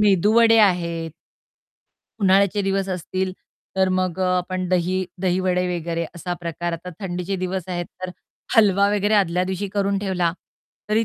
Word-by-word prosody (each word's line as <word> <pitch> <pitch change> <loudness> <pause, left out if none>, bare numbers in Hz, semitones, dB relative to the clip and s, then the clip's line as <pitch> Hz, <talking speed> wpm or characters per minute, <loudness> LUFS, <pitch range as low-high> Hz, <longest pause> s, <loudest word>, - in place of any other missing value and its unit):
मेदूवडे 215 +3 +5
आहेत. 170 -5 +2 1.1
उन्हाळ्याचे 200 +1 +3
दिवस 195 0 0
असतील, 185 +1 -2 0.4
तर 190 0 +3
मग 185 -1 0
अ, - - +2 0.2
आपण 185 0 -3
दही 185 +1 +1 0.2
दहीवडे 180 0 +1
वगैरे 170 0 -2
असा 175 +1 -4
प्रकार 170 0 -3
आता 170 +2 -6
थंडीचे 180 0 -3
दिवस 185 -1 -3
आहेत 175 -1 -3 0.2
तर 185 - -3 0.5
हलवा 200 -2 +5
वगैरे 205 +1 +2
आदल्या 180 -3 +2
दिवशी 190 +2 -3
करून 200 0 0
ठेवला, 185 -4 0 0.6
तरी 220 +2 +2
185 Hz, 140 wpm, -22 LUFS, 175-195 Hz, 1.1 s, मेदूवडे